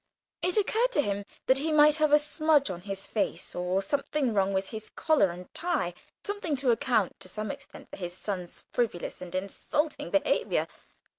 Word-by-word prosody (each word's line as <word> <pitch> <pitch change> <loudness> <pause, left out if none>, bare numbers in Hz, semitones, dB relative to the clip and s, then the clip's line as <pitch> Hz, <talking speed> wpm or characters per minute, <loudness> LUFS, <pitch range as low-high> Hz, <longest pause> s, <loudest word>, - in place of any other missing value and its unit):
It 360 +2 +1
occurred 450 +4 +2
to 290 - +4
him 200 -2 -2 0.2
that 260 +1 +4
he 315 +3 -1
might 300 0 +6
have 305 -1 +3
a 295 - +9
smudge 300 - +2
on 175 -1 -6
his 195 +1 -4
face 215 - -2
or 180 +2 0
something 275 +2 0
wrong 195 -1 +2
with 190 0 -1
his 220 -1 -7
collar 305 - +3
and 180 +1 -9
tie 320 - -1 0.3
something 405 -7 -2
to 260 -2 +2
account 230 -5 +1
to 185 - -9
some 215 +1 -3
extent - - -11
for - - -7
his 175 -1 -5
son's 185 -4 -5
frivolous 220 -9 -1
and 180 0 -7
insulting 290 +10 -2
behaviour. 295 - +1
230 Hz, 180 wpm, -29 LUFS, 190-300 Hz, 0.3 s, a